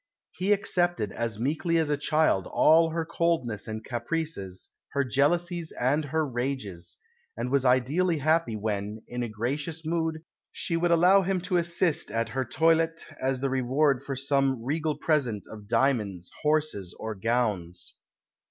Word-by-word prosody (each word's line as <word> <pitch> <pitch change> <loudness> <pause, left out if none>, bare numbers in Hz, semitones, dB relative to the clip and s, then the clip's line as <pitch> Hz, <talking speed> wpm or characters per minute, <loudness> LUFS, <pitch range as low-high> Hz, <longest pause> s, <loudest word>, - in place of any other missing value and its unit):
He 190 +3 -1
accepted 175 - +1
as 115 -2 -3
meekly 160 +6 0
as 160 -2 +1
a - - +3
child 145 - +1
all 165 +1 +5
her 165 0 -2
coldness 160 -11 -1
and 110 0 -6
caprices, 120 - -4 0.2
her 140 - +2
jealousies 170 +6 0
and 145 +5 +1
her 155 +2 0
rages; 120 - -4 0.4
and 125 - -3
was 135 -1 +2
ideally 145 +8 +2
happy 155 -5 +1
when, 105 0 -3
in 125 0 -4
a 120 - -2
gracious 145 +9 -3
mood, 160 -1 -1 0.3
she 165 - -2
would 170 +1 +1
allow 180 +4 +6
him 190 0 0
to 180 0 0
assist 170 -1 +1
at 115 0 -1
her 130 +3 -1
toilette 165 +5 +2 0.2
as 130 -1 0
the 135 - 0
reward 135 +1 +2
for 135 0 -5
some 135 -2 +1
regal 150 +2 -1
present 140 -10 0
of 105 -2 -11
diamonds, 110 -7 0
horses, 150 - 0
or 110 0 -4
gowns. 100 -5 -2
140 Hz, 150 wpm, -27 LUFS, 115-165 Hz, 0.4 s, allow